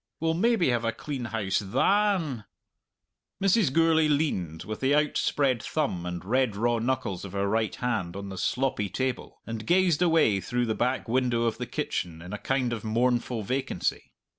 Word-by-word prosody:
We'll 160 0 +1
maybe 205 - +2
have 120 -1 +1
a 115 - +1
clean 135 0 -5
house 110 -4 -1
than." 165 - +1 0.9
Mrs. 195 - +3
Gourlay 160 +1 +4
leaned, 95 - -1
with 110 0 -6
the 135 +2 +2
outspread 145 -4 +1
thumb 95 - -2
and 90 +1 -5
red 125 0 +1
raw 120 +2 +1
knuckles 115 -6 -2
of 100 - -8
her 100 0 0
right 110 +1 0
hand, 110 -8 -2
on 100 0 -6
the 95 - -7
sloppy 125 -2 0
table, 130 +5 -3
and 115 -1 -6
gazed 175 -3 +3
away 160 - +3
through 125 +3 -1
the 110 - 0
back 125 +3 -1
window 120 -1 +1
of 115 -1 -1
the - - -3
kitchen 85 -2 -3
in 90 +4 -9
a 105 - -4
kind 125 +2 0
of 110 - -5
mournful 120 0 0
vacancy. 130 +6 -2
120 Hz, 175 wpm, -27 LUFS, 105-145 Hz, 0.9 s, Gourlay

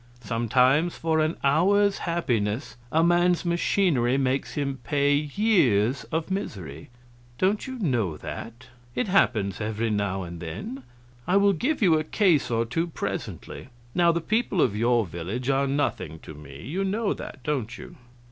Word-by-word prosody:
Sometimes 125 +9 +2
for 160 -1 +1
an 155 +1 0
hour's 195 +8 +3
happiness 120 -7 -1 0.2
a 160 +1 +3
man's 175 +1 +3
machinery 170 -7 +2
makes 135 0 -1
him 140 -2 -2
pay 140 +3 +2
years 145 - +2
of 165 +3 -3
misery. 95 - -5 0.5
Don't 200 - +1
you 260 0 -5
know 120 - 0
that? 115 +9 -8 0.3
It - - 0
happens 110 - +2
every 110 +1 -1
now 100 -2 -1
and 85 -1 -8
then. 85 +11 -6 0.5
I 185 - +4
will 200 0 +4
give 260 - -1
you 165 -5 +5
a - - -2
case 170 -2 +2
or 115 -1 +1
two 165 +9 -1
presently. 160 - -5 0.3
Now 170 -1 +4
the 170 0 -1
people 215 0 0
of 110 -9 +3
your 115 +1 +2
village 95 - -3
are 135 +1 +1
nothing 95 - -1
to - - -9
me 70 -2 -11
you 175 +10 -2
know 205 +2 0
that, 130 - -9
don't 130 -4 -2
you?" 185 -1 -11
140 Hz, 155 wpm, -26 LUFS, 115-175 Hz, 0.5 s, you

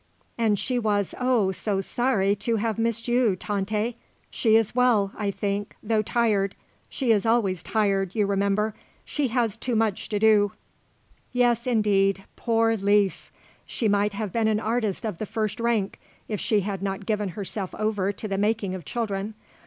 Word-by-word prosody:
"And 220 -3 +2
she 250 +4 -1
was, 205 -4 0
oh, 250 -6 +2
so 195 +1 -1
sorry 200 -2 +1
to 230 +3 -1
have 225 0 -1
missed 230 0 0
you, 240 -4 +3
Tante. 210 +4 -2 0.4
She 220 -2 +3
is 225 -2 +3
well, 235 -6 +3
I 210 -2 -2
think, 200 0 -3
though 220 0 +2
tired; 210 -3 +1 0.3
she 255 -4 0
is 205 -3 +3
always 220 -6 +1
tired, 195 -3 0
you 210 -2 +2
remember. 200 +2 +1 0.3
She 290 -2 -1
has 230 -3 0
too 245 -2 -2
much 220 -3 0
to 210 - 0
do." 205 -2 +4 1.1
"Indeed, 205 -5 +2
yes; 195 - -18
poor 225 -1 +2
Lise. 200 -1 +1 0.4
She 230 - -1
might 205 0 +2
have 205 -1 -3
been 225 -1 +2
an 215 -1 +2
artist 220 -2 -1
of 210 -6 -4
the 215 - -3
first 215 0 -2
rank 230 -4 0 0.3
if 210 -3 -3
she 210 -2 +1
had 195 -1 -4
not 195 0 -3
given 210 -2 -1
herself 195 -1 -4
over 210 -2 0
to 210 +2 -7
the 195 -1 -2
making 210 -2 0
of 185 -2 -6
children. 215 -2 -3
210 Hz, 170 wpm, -25 LUFS, 200-225 Hz, 1.1 s, do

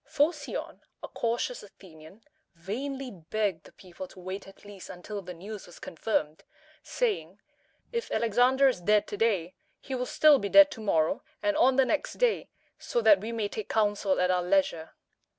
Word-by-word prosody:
Pho´cion, 295 0 -1 0.2
a - - -5
cautious 240 +1 -2
Athenian, 185 0 -16 0.3
vainly 260 +9 -5
begged 190 0 -3
the - - -15
people 185 0 -10
to 185 - -15
wait 185 +2 -6
at 195 - -16
least 205 -2 -11
until 200 +3 -7
the 180 -1 -9
news 200 +4 -9
was 175 - -14
confirmed, 160 -4 -3 0.4
saying, 470 -5 -2 0.5
"If 470 -1 -3
Alexander 245 +4 +3
is 250 -9 0
dead 210 +3 +3
to 205 - -5
day, 195 -6 +1 0.3
he 270 - -7
will 250 -1 -2
still 300 -3 +5
be 200 - -3
dead 295 +4 +8
to 225 - -8
morrow 180 - +1 0.2
and 310 -1 +1
on 265 -4 +4
the 265 0 +4
next 300 - -1
day, - - 0 0.3
so - - -1
that 210 -4 +6
we 220 +2 -4
may 225 -3 -1
take 210 0 -6
counsel 205 -3 +1
at 180 0 +2
our 180 -1 +2
leisure." 180 - 0
210 Hz, 175 wpm, -28 LUFS, 185-265 Hz, 0.5 s, dead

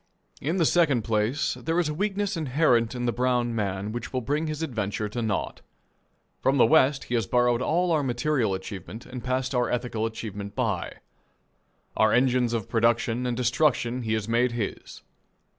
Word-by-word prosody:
In 160 +7 -1
the 170 - +3
second 145 -9 +3
place, 110 +6 0
there 165 +2 -1
is 175 - +1
a 150 - -2
weakness 200 +3 -1
inherent 130 -6 +2
in 120 0 -2
the 120 - +2
brown 120 0 0
man 100 -1 -2
which 120 +2 -5
will 130 - -1
bring 145 +7 -1
his 155 +1 -3
adventure 110 -6 -2
to 120 +3 -4
naught. 110 -3 -2 0.8
From 135 +1 +2
the 120 - +6
West 140 0 +4
he - - -6
has 115 -5 +1
borrowed 120 +1 +2
all 175 +6 +1
our 155 -2 +3
material 125 -4 0
achievement 100 +4 -8
and 125 -1 -8
passed 130 +1 -1
our 125 -2 +1
ethical 115 -2 -1
achievement 105 -2 -7
by. 110 -9 -1 1.0
Our 110 -1 +3
engines 125 -1 +3
of 115 -4 -2
production 115 +1 +1
and 120 -1 -2
destruction 125 -1 +1
he 110 -2 -1
has 110 -1 -1
made 120 +1 +2
his. 115 -4 -5
120 Hz, 175 wpm, -26 LUFS, 110-140 Hz, 1.0 s, the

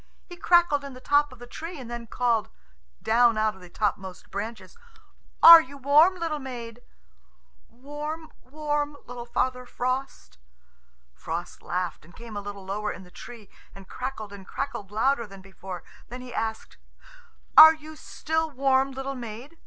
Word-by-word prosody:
He 355 - -10
crackled 345 -5 +3
in 280 -1 -8
the 255 - -11
top 290 +2 +2
of 255 - -13
the 245 - -11
tree, 330 +7 -8
and 250 - -9
then 235 0 -7
called; 235 -2 0 0.5
down 235 0 +4
out 215 0 +1
of 190 - -17
the 180 - -13
topmost 190 -1 -3
branches, 220 - -6 0.7
"Are 335 0 +12
you 280 0 -11
warm, 295 +7 +5
little 330 -4 -3
maid?" 240 -3 -8 0.9
"Warm, 295 +5 -7
warm, 295 +1 -3
little 240 0 -8
Father 250 +1 -1
Frost." 255 - -4 0.7
Frost 165 - -6
laughed, 180 -1 -3
and 170 +3 -18
came 230 -2 -10
a 205 - -3
little 200 -1 -8
lower 210 +2 -3
in 190 - -9
the 180 - -17
tree 230 -1 -11 0.3
and 195 -1 -13
crackled 250 -5 -6
and 195 -2 -11
crackled 200 -2 -5
louder 235 +3 +1
than 195 -1 -12
before. 190 -1 -9 0.3
Then 250 +1 -7
he 250 -1 -10
asked, 220 0 -4 0.8
"Are 315 +1 +11
you 310 0 -12
still 320 +1 -2
warm, 270 -1 +2
little 270 +1 -4
maid? 245 +5 -9
245 Hz, 160 wpm, -26 LUFS, 210-290 Hz, 0.9 s, Are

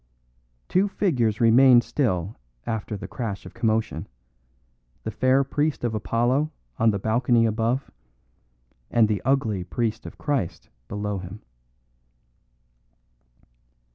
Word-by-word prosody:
Two 190 +3 +2
figures 125 - 0
remained 120 +1 +6
still 100 - -1 0.3
after 110 -1 -3
the - - -7
crash 110 -6 -5
of - - -10
commotion: 110 -7 -1 1.0
the - - -3
fair 130 +1 +3
priest 145 +1 -1
of 120 -2 0
Apollo 120 +7 +1 0.3
on 115 - +4
the 100 - +1
balcony 115 +3 +2
above, 115 +4 0 1.0
and 115 -2 +4
the 105 -3 -1
ugly 115 -8 +1
priest 110 +3 -2
of - - -11
Christ 105 - -2 0.2
below 105 +2 -3
him. 90 +3 -9
115 Hz, 110 wpm, -25 LUFS, 105-130 Hz, 1.0 s, remained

